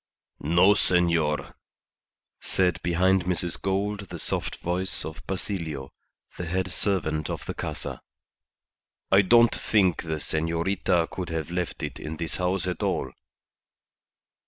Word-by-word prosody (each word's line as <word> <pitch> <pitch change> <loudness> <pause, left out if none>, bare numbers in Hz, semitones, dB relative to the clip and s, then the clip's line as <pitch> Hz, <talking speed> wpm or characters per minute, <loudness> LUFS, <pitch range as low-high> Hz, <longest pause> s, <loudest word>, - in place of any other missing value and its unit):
"No, 85 +6 +5
senor," 85 -6 +2 0.9
said 90 -2 +1
behind 90 +1 +2
Mrs. 90 -1 0
Gould 100 +1 -1
the - - -6
soft - - -2
voice 90 +2 -1
of 80 0 -7
Basilio, 85 -8 -4 0.5
the 85 - -4
head 95 +1 -1
servant 80 -8 0
of - - -4
the - - -3
Casa. - - -5 1.1
"I 95 +1 +7
don't 115 +4 +6
think 95 -6 +2
the 80 -1 -3
senorita 85 +3 0
could 90 -2 -4
have 80 0 -3
left 90 -1 -3
it - - -4
in 80 +1 -5
this 85 0 -3
house 90 0 0
at 90 -2 -3
all." - - 0
90 Hz, 130 wpm, -26 LUFS, 80-95 Hz, 1.1 s, I